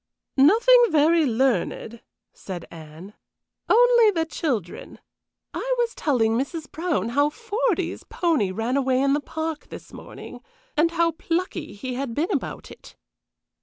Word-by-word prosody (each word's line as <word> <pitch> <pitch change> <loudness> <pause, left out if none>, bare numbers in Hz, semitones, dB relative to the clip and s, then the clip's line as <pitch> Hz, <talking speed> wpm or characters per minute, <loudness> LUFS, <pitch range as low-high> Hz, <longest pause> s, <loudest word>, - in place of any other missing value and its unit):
"Nothing 470 - +6
very 315 0 +3
learned," 235 -2 -1 0.3
said 180 -3 -8
Anne. 160 +4 -11 0.6
"Only 475 -1 +6
the 330 -5 0
children. 245 - -4 0.6
I - - -1
was 475 -1 0
telling 240 -7 +1
Mrs. 290 +5 -4
Brown 330 -8 -1
how 285 +4 +2
Fordy's 430 -3 -2
pony 320 - 0
ran 225 +7 -1
away 260 -2 +1
in 275 +1 +2
the 295 - 0
park 315 +1 -5
this - - -11
morning, - - -10 0.4
and 315 +3 +3
how 335 0 +1
plucky 330 0 -3
he 255 +5 -5
had 250 -2 -4
been 315 +5 -1
about - - -4
it." - - -14
300 Hz, 135 wpm, -24 LUFS, 250-345 Hz, 0.6 s, Nothing